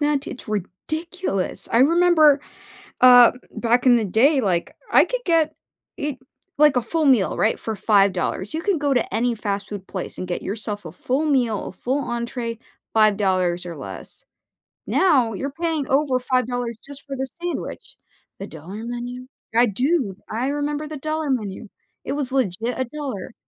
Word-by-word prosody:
met, 290 -1 +1
it's 240 - -8
ridiculous. 215 - -3
I 230 - +4
remember, 315 -1 +5 0.6
uh, 245 -1 +9
m 250 - -12
back 240 +2 +2
in 250 - +7
the 225 - +1
day, 260 - +3
like, 180 -7 -1 0.2
I - - +6
could - - -3
get 320 -3 +2 0.4
it 285 -2 -3 0.4
like, 300 -2 +5
a 250 - +3
full 320 +4 0
meal, 245 -8 +3
right, 220 - +2
for 220 - -4
$5. 195 -1 +1
You 320 - -2
can 400 -3 +1
go 290 -2 0
to 245 -6 0
any 235 +2 +1
fast 205 -2 -3
food 200 -2 -6
place 185 - -6
and 185 - -5
get 175 - -3
yourself 205 -1 -3
a 160 - -8
full 260 +11 -1
meal, 245 -8 +1
a - - -9
full 270 +3 -2
entrée, 235 -1 -4 0.3
$5 190 -5 +2
or 170 -2 -7
less, 135 - -7 0.6
now 270 -12 +3
you're 275 +7 -4
paying 325 -2 -2
over 275 -1 +2
$5 245 -2 -1
just 285 0 -10
for 275 -1 -5
the 265 0 -2
sandwich. 350 +7 -5 0.4
The 195 - -6
dollar 180 +7 -9
menu? 245 +1 -6 0.3
I 240 +1 +6
do, 250 - 0 0.2
I 235 +4 -1
remember 290 +1 -2
the 310 - -6
dollar 310 +1 -2
menu, 215 -4 -2 0.4
it - - -2
was 280 -3 0
legit 240 -1 -1
a 260 - +1
dollar. 255 -7 -6
250 Hz, 170 wpm, -22 LUFS, 210-290 Hz, 0.6 s, uh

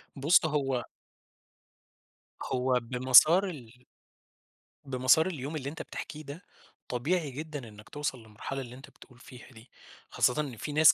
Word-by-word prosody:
بُص، 155 +5 +4
هو 135 -5 -1 1.6
هو 125 0 +1
بمسار 130 +9 +6
ال 125 -5 -12 1.0
بمسار 135 +5 +3
اليوم 150 -3 -5
اللي 140 -2 -4
أنت 155 - -8
بتحكيه 155 0 -8
ده، 145 +7 -10 0.4
طبيعي 145 +4 -1
جدًا 145 -3 -7
إنّك 105 0 -14
توصل 145 -3 -4
للمرحلة 110 +5 -7
اللي 120 -1 -9
أنت 135 - -13
بتقول 125 -2 -19
فيها 125 -1 -13
دي. 115 +1 -16 0.4
خاصةً 125 +4 +2
إن 135 -6 -6
في 145 - -5
ناس 155 +1 +7
135 Hz, 135 wpm, -29 LUFS, 125-150 Hz, 1.6 s, ناس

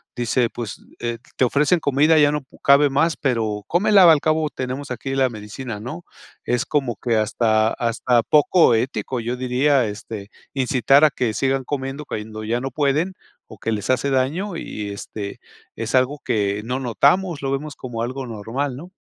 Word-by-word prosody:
dice, 120 0 +1
pues, 115 -3 -7 0.2
eh, 120 0 -3 0.2
te - - +1
ofrecen 150 +7 +3
comida 145 +3 +3
ya 145 -1 +5
no 150 -2 -3 0.2
cabe 140 +1 +6
más, 150 +4 +1
pero, 110 -6 -1
cómela 190 0 +5
al 155 -3 +5
cabo 155 -1 +1
tenemos 130 +1 -5
aquí 125 +2 -4
la 135 -1 +3
medicina, 110 0 -7
¿no? 155 +9 -7 0.4
Es 125 +3 0
como 135 -6 -1
que 115 +1 0
hasta 110 0 +2
hasta 120 +1 +1
poco 150 0 +4
ético 125 +2 -2
yo 120 +2 -3
diría, 130 +1 +2
este, 105 -1 -7 0.2
incitar 135 +1 +3
a 155 - +7
que 120 -4 -1
sigan 135 +2 0
comiendo 135 +1 -4
cuando 110 -2 -6
ya 120 +3 -1
no 135 - -3
pueden 150 +7 0 0.3
o 110 - -12
que 115 - -3
les 105 -2 -4
hace 135 +2 +1
daño, 155 +9 0
y 105 -10 -5
este 100 0 -7 0.4
es 115 +2 -3
algo 130 +3 +2
que 100 -1 0
no 125 +3 -2
notamos, 145 - +2
lo 135 -1 -2
vemos 145 +2 -3
como 120 -3 -6
algo 130 +2 -4
normal, 120 +5 -4
¿no? 175 +6 -10
130 Hz, 175 wpm, -21 LUFS, 115-145 Hz, 0.4 s, a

